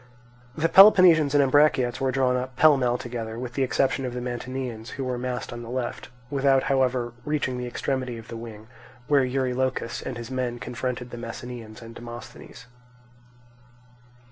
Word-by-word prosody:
The 160 +1 +2
Peloponnesians 175 -7 +7
and 145 - +6
Ambraciots 130 -3 +3
were 135 -1 +1
drawn 130 -1 +1
up 125 0 -4
pell 155 +2 +6
mell 125 -2 +1
together, 115 -3 -6
with 120 0 -6
the 135 - -2
exception 135 +1 +1
of 125 -1 -4
the - - -2
Mantineans, 125 -1 -5
who 135 - -4
were 125 -1 -3
massed 125 -1 -4
on 120 - -7
the 115 - -9
left, 125 -1 -4 0.2
without 135 -1 +3
however 130 -3 0
reaching 150 -3 -1
to - - -4
the 125 - -4
extremity 130 -1 -3
of 115 0 -11
the 115 - -8
wing, 115 -2 -9 0.4
where 140 -2 +4
Eurylochus 130 -1 -1
and 130 - -5
his 120 +2 -8
men 125 -2 -2
confronted 125 +2 -5
the - - -7
Messenians 115 -1 -8
and 115 0 -10
Demosthenes. 120 +1 -10
125 Hz, 170 wpm, -25 LUFS, 120-135 Hz, 0.4 s, Peloponnesians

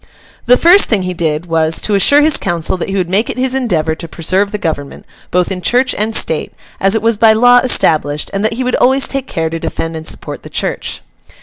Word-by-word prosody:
The 250 - +6
first 355 +7 +5
thing 210 -5 +1
he 180 0 -3
did, 160 -1 -2
was, 165 -1 0
to 210 - -2
assure 285 +9 +4
his 310 -1 +3
council 175 -1 -2
that 180 - -5
he 195 - -3
would 185 -3 -1
make 200 +6 0
it - - -4
his 260 0 -1
endeavour 175 -12 0
to 165 +1 -7
preserve 185 +5 -1
the 210 - -3
Government, 155 -7 -5 0.2
both 180 +1 0
in 185 -1 -4
Church 250 +7 +1
and 215 +1 -2
State, 160 - -1 0.3
as 195 +2 +2
it 220 - -1
was 225 -1 +1
by 220 0 +5
law 245 +2 +5
established; 150 - +1
and 195 +1 -2
that 220 - 0
he 255 +3 -3
would 250 0 0
always 265 +2 +2
take 270 -1 -3
care 160 -1 -3
to 165 - -4
defend 165 0 -4
and 160 0 -7
support - - -6
the - - -11
Church. - - -4
195 Hz, 235 wpm, -14 LUFS, 165-245 Hz, 0.3 s, The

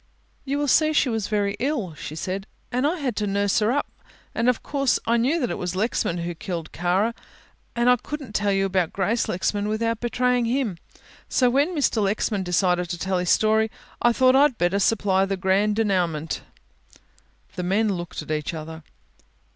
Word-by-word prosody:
"You 285 +1 -1
see 310 +3 +4
she 290 - +3
was 220 -4 -1
very 205 -1 0
ill," 245 - -1
she 155 0 -7
said, 190 +4 -4 0.2
"and 255 +3 +1
I 340 +4 -1
had 265 -8 -2
to 210 - 0
nurse 200 +1 +1
her 215 +1 +2
up, 285 +3 0 0.5
and 235 +2 +2
of 250 - 0
course 275 -2 +1
I 235 +1 +2
knew 270 +9 +2
that 245 - -1
it - - -4
was 180 0 -3
Lexman 190 -4 0
who 170 0 -3
had 170 - -7
killed 170 -4 -5
Kara 185 +6 +1 0.6
and 240 0 +1
I 250 0 +6
couldn't 275 -3 -7
tell 205 -1 +1
you 195 0 +2
about 185 -3 0
Grace 210 +5 0
Lexman 205 +4 -1
without 230 +1 -1
betraying 245 0 +1
him. 230 -7 -1 0.5
So 250 -2 +3
when 290 +7 +1
Mr. 270 -7 +1
Lexman 205 0 0
decided 180 -1 +1
to 175 - -3
tell 185 +2 -1
his 180 -1 -1
story, 220 0 +3 0.3
I 240 - +5
thought 255 +2 +4
I'd 275 -3 +4
better 175 +3 +1
supply 195 -2 +2
the 195 0 -2
grand 195 +3 +2
denouement." 175 -8 0 1.1
The 180 - -3
men 200 +5 +1
looked 175 -3 -5
at - - -15
one 155 -1 0
another. 160 0 -8
210 Hz, 190 wpm, -24 LUFS, 185-245 Hz, 1.1 s, I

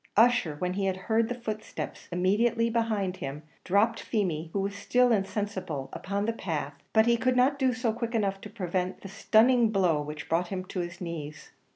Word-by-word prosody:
Ussher, 225 -9 +4
when 180 +3 -1
he 195 +1 -1
had 190 -1 -1
heard 220 +4 +1
the 245 - -2
footsteps 215 -3 -6
immediately 220 +6 +2
behind 215 -5 0
him, 145 -3 -6 0.2
dropped 210 +5 +2
Feemy, 170 -8 -1
who 200 - -1
was 200 +1 -1
still 245 +5 +2
insensible, 195 -9 -2
upon 200 +2 -2
the 230 - 0
path; 155 -9 -3 0.2
but 220 0 +5
he 235 0 +4
could 255 +2 +1
not 265 +3 +3
do 260 -2 +3
so 245 -3 -1
quick 235 0 -3
enough 195 -3 0
to 210 - -8
prevent 185 -3 -3
the - - -8
stunning 225 +4 +4
blow 180 -7 +2
which 150 0 -6
brought 170 +2 +1
him 185 0 -4
on 180 - +1
his 175 +1 -7
knees. 155 -4 -6
200 Hz, 195 wpm, -28 LUFS, 180-230 Hz, 0.2 s, but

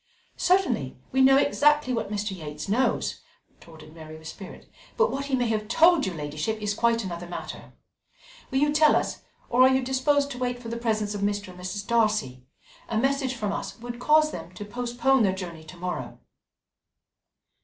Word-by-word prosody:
"Certainly, 350 - +1
we 265 - +2
know 270 +1 +7
exactly 290 -1 +3
what 220 -3 -2
Mr. 205 -1 -2
Yates 150 -1 -7
knows," 240 +6 0 0.3
retorted 155 -2 -15
Mary 155 -1 -10
with 160 0 -11
spirit, 190 +4 -10 0.3
"but 470 +1 +3
what 275 +1 -3
he 275 -2 0
may 245 -2 +1
have 215 -1 -1
told 325 - +4
your 185 - -4
ladyship 155 +8 -3
is 210 -1 -1
quite 230 +1 +1
another 175 -2 -6
matter. 175 - -8 0.8
Will 265 - -1
you 295 +2 +2
tell 305 0 +5
us, - - -1 0.3
or 245 +1 +2
are 260 - +8
you 265 0 +2
disposed 280 +2 +1
to 250 - -6
wait 245 -1 -2
for 235 -2 -8
the 230 - -3
presence 215 -3 -1
of 205 - -4
Mr. 205 -1 -1
and 180 0 -12
Mrs. 200 +3 -5
Darcy? 210 - +1 0.5
A 220 - -1
message 270 +1 0
from 210 -4 -2
us - - -5
would 240 0 -7
cause 305 +3 +4
them 165 0 -8
to 205 - -7
postpone 245 +4 +1
their 190 -3 +2
journey 170 -4 -7
to 160 +3 -12
morrow." 180 +1 -5
230 Hz, 185 wpm, -26 LUFS, 185-265 Hz, 0.8 s, are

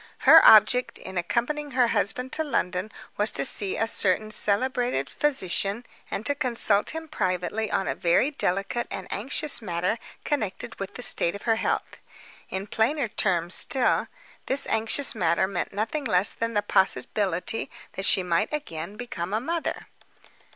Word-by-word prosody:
Her - - +9
object 220 +4 +6
in 190 - -10
accompanying 280 - -2
her 245 -2 +4
husband 250 +6 -1
to 315 - +2
London 210 - -2 0.3
was 210 +1 +4
to 140 - +3
see 195 +5 +1
a 225 - +1
certain 215 -1 +1
celebrated 215 - 0
physician, 230 -5 -1 0.2
and 215 - -5
to 285 - +5
consult 235 -6 +2
him 320 0 -6
privately 205 - -2
on 195 - -1
a - - 0
very 175 - +1
delicate 195 -1 -2
and 185 - -6
anxious 265 +4 0
matter 180 +2 -2 0.3
connected 220 -11 -3
with 195 -1 -6
the 250 - -3
state 170 -4 +3
of 200 - -9
her 225 -1 +1
health. - - -2 0.5
In 190 +1 -4
plainer 235 +5 0
terms 175 -4 0
still, 260 -3 +2 0.4
this 275 +1 +3
anxious 225 +5 0
matter 175 -3 +1
meant 180 -3 -4
nothing 225 +9 -3
less 195 -3 +2
than 230 -1 -4
the 205 - +1
possibility 190 - 0 0.2
that 190 - -1
she 190 - +5
might 175 +3 0
again 200 - -5
become 205 -6 -5
a - - +1
mother. 330 +7 -4
215 Hz, 160 wpm, -25 LUFS, 185-250 Hz, 0.5 s, Her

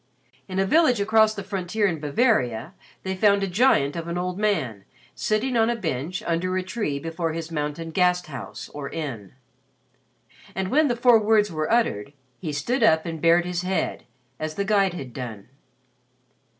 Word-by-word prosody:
In 185 - -5
a 195 - +3
village 255 - +4
across 215 +1 +4
the 200 - -5
frontier 195 +2 -1
in 170 -5 0
Bavaria 150 - +1 0.3
they 190 0 -2
found 200 0 +3
a - - 0
giant 180 - +3
of 170 -1 -5
an 170 +1 -3
old 180 +1 -3
man 155 - 0 0.3
sitting 230 +4 -1
on 225 0 +3
a 240 - +1
bench 165 - -3
under 180 +2 0
a 185 - -1
tree 185 -7 -2
before 165 +2 -3
his 165 0 -5
mountain 150 +1 -3
"Gasthaus" 180 - -1
or 145 -1 -5
inn; 130 - -6 1.2
and 190 0 -2
when 305 +5 +4
the 240 - 0
four 240 -1 +5
words 210 -2 +3
were 155 +2 -2
uttered, 140 - +1 0.3
he 160 -5 -4
stood 235 - -1
up 160 -8 +4
and 165 -2 -5
bared 170 +1 +4
his 180 0 -2
head 185 +1 -2 0.3
as 155 0 -4
the 200 - -1
guide 195 -3 +2
had 130 -7 -7
done. 120 -5 -7
180 Hz, 175 wpm, -24 LUFS, 155-210 Hz, 1.2 s, four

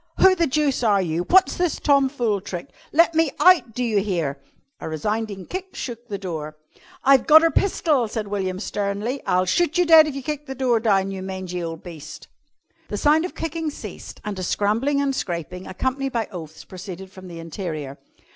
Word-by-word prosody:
"Who 380 - +7
the 340 -3 +1
deuce 285 -1 +1
are 210 -4 +3
you? 175 -1 -1
What's 380 +1 +5
this 355 -2 0
tomfool 265 -7 +2
trick? 180 -3 -6 0.2
Let 335 +2 +4
me 325 -1 +3
out! 345 - +5
Do 250 - -1
you 220 -4 +2
hear?" 165 -9 -2 0.4
A - - -5
resounding 200 +4 -3
kick 375 +1 -6
shook 240 -1 -6
the 205 -3 -4
door. 155 -5 -6 0.5
"I've 270 -2 +5
gotter 320 +1 +7
pistol," 300 - +1
said 215 -1 -4
William 190 -2 -2
sternly. 205 +6 -3
"I'll 185 0 +2
shoot 325 - +1
you 355 - +4
dead 320 -2 +8
if 290 - -4
you 275 - -5
kick 295 +1 -4
the 265 - -5
door 250 -3 +2
down, 195 -3 +2
you 190 -1 -5
mangy 185 -2 -5
ole 165 -1 -4
beast!" 155 -3 -10 0.6
The - - -4
sound 310 +3 +3
of 365 - -7
kicking 325 0 -3
ceased 290 - -9
and 205 -2 -4
a - - -3
scrambling 225 +10 +1
and 280 -1 +1
scraping, 180 - -4
accompanied 260 +7 -2
by 230 -3 -1
oaths, 160 -4 -9
proceeded 185 0 -9
from 185 -1 -12
the 170 -1 -9
interior. 160 -4 -6
215 Hz, 190 wpm, -23 LUFS, 185-285 Hz, 0.6 s, dead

